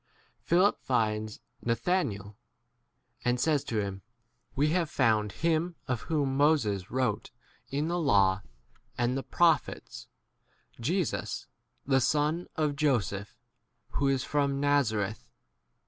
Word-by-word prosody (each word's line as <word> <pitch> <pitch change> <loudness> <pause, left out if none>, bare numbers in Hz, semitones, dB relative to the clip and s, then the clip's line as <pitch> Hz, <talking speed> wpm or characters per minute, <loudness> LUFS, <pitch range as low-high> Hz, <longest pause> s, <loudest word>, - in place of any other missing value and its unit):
Philip 185 +4 +3
finds 110 -3 -1 0.2
Nathanael, 115 - -1 0.9
and 125 0 +1
says 150 0 +2
to 115 - -2
him, 100 -1 -3 0.5
We 145 +3 +2
have 170 -1 +1
found 110 -5 +2
him 165 - 0
of 125 -4 -1
whom 145 -5 -1
Moses 135 - +2
wrote 130 0 -1 0.4
in 145 +3 -1
the 175 +1 0
law 100 - +3 0.6
and 120 +1 +1
the 135 - -1
prophets, 165 +2 0 0.7
Jesus, 170 +7 -1 0.4
[the] 135 -1 +3
son 150 +6 +1
of 150 -2 0
Joseph, 115 -9 0 0.5
who 140 - 0
is 135 -2 +1
from 140 -2 0
Nazareth. 110 -8 0
135 Hz, 115 wpm, -29 LUFS, 110-155 Hz, 0.9 s, Philip